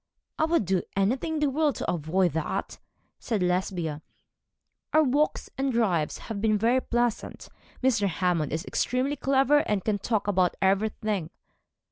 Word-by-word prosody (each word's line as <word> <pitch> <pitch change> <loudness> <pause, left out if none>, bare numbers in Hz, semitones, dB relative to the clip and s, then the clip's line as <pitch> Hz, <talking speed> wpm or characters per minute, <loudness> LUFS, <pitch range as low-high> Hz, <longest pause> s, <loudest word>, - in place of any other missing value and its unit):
'I 315 - +4
would 325 - +1
do 185 0 +1
anything 245 +11 0
in - - -1
the 295 - +3
world 295 0 +1
to - - -2
avoid 175 +2 +1
that,' 160 -1 -3 0.5
replied 210 -6 +1
Lesbia. 180 -4 -2 0.9
'Our 310 - +6
walks 290 +2 0
and 270 0 +1
drives 190 -10 +1
have 215 -3 -6
been 215 -1 +2
very 235 +5 +2
pleasant. 240 -2 -2 0.3
Mr. 230 -6 +3
Hammond 175 -4 0
is 160 +5 -3
extremely 260 +3 0
clever, 275 +2 +3
and 210 -8 -1
can 210 -2 0
talk 215 0 -1
about 185 -3 +2
everything.' 200 -2 0
210 Hz, 150 wpm, -27 LUFS, 180-260 Hz, 0.9 s, Our